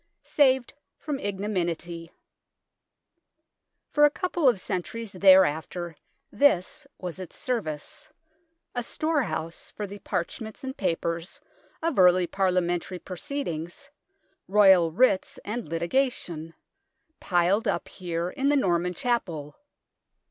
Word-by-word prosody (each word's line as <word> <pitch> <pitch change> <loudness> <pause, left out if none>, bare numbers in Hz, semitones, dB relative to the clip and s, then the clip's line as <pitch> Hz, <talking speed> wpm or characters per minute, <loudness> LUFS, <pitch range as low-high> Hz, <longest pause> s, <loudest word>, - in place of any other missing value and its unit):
SAVED 265 -4 +2 0.2
FROM 295 -3 -4
IGNOMINY 175 -5 -3 1.8
For 295 - +3
a 295 - +8
couple 345 -3 +1
of 230 -6 0
centuries 200 +4 -4
thereafter 180 -3 +4 0.4
this 285 - +2
was 180 0 -6
its 185 - -8
service 195 - -4 0.6
a 245 - -1
storehouse 255 - -2
for 210 - -5
the 200 +1 -9
parchments 205 +6 -4
and 265 0 -5
papers 170 -1 -2 0.4
of 330 -9 0
early 180 0 +6
Parliamentary 180 -1 0
proceed 280 - -5
ings, 175 - -6 0.6
Royal 190 -4 +6
writs, 195 +1 +2
and 215 -4 -4
litigation, 170 - -1 0.6
piled 185 +5 +2
up 200 - -1
here 175 -1 -4
in 275 0 -1
the 290 0 +4
Norman 180 -6 +1
Chapel. 175 - -2
190 Hz, 105 wpm, -26 LUFS, 170-250 Hz, 1.8 s, a